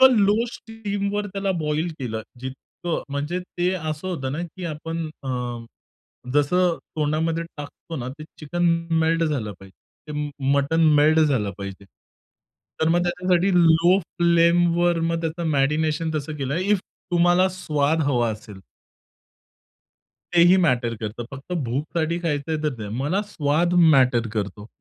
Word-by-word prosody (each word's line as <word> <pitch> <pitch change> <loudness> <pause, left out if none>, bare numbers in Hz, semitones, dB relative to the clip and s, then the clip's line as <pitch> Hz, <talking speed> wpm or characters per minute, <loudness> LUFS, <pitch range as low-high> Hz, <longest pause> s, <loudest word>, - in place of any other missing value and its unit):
पण 260 -1 +8
लो 210 +3 +3
स्टीमवर 205 -2 -3
त्याला 195 0 -2
बॉईल 155 +2 -1
केलं 110 -4 -4 0.2
जितकं, 135 +6 -5
म्हणजे 145 +5 -2
ते 180 0 -2
असं 155 0 -4
होतं 135 -8 -3
ना 150 - -3
की 175 +2 -9
आपण 165 +1 -4
अ, 135 - -6 1.1
जसं 170 +4 +3 0.2
तोंडामध्ये 160 +2 0
टाकतो 145 +3 -8
ना 125 -1 -4
ते 155 - -8
चिकन 175 +3 -3 0.3
मे - - +2
मेल्ट 165 +1 +2
झालं 130 -9 -2
पाहिजे. 95 - -13 0.4
ते - - -5
म - - -7 0.2
मटण 140 +4 +1 0.2
मेल्ट 155 +2 +5
झालं 130 -10 +2
पाहिजे. 100 0 -7 1.0
तर 160 - +3
मग 175 +1 +3
त्याच्यासाठी 180 +1 +1
लो 170 +1 +5
फ्लेमवर 170 0 +3
मग 165 - -1
त्याचं 165 +1 -3
मॅरीनेशन 150 +3 +1
तसं 150 0 -3
केलंय. 140 +5 -2
इफ 200 0 +2 0.3
तुम्हाला 175 +2 +4
स्वाद 160 -4 0
हवा 125 -5 +1
असेल. 105 -2 -9 1.7
तेही 175 +2 +7
मॅटर 120 -6 +1
करतं. 110 +2 -5
फक्त 135 +5 -9
भूकसाठी 155 +7 -1
खायचंय 160 -1 -1
तर 150 -3 0
नाही. 105 -2 -5
मला 150 +9 0
स्वाद 155 +4 +1 0.2
मॅटर 125 -3 +3
करतो. 105 -1 -4
160 Hz, 140 wpm, -23 LUFS, 140-175 Hz, 1.7 s, पण